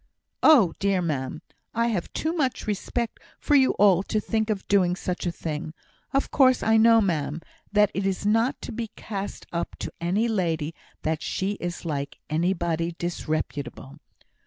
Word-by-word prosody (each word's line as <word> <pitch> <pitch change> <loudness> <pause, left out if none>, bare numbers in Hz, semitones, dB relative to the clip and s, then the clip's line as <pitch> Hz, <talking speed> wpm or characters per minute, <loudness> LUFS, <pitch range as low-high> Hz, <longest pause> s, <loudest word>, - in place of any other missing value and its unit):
"Oh 245 - +6
dear! 195 -1 +2
ma'am, 150 -4 -3 0.3
I 230 +1 +2
have 195 -7 -2
too 320 +1 -1
much 275 -7 -1
respect 220 +3 -2 0.2
for 295 - 0
you 265 -2 +5
all 195 -3 +5
to 215 +2 -1
think 220 +1 -1
of 205 -3 -2
doing 185 -3 +3
such 180 -1 -3
a - - +1
thing! 155 -1 -5 0.4
Of 275 - 0
course 260 -3 +4
I 220 - +4
know, 225 0 +6
ma'am, 160 -5 -1 0.3
that 210 -1 +4
it 195 0 -1
is 195 +1 -2
not 225 +5 +2
to - - -5
be 230 0 -3
cast 200 -2 -5
up 170 - -2
to - - -6
any 195 +7 +1
lady 165 -7 -1 0.3
that 160 0 -1
she 190 +1 -1
is 175 0 -5
like 140 -3 -3
anybody 170 0 0
disreputable." 155 -4 -4
190 Hz, 165 wpm, -25 LUFS, 165-220 Hz, 0.4 s, Oh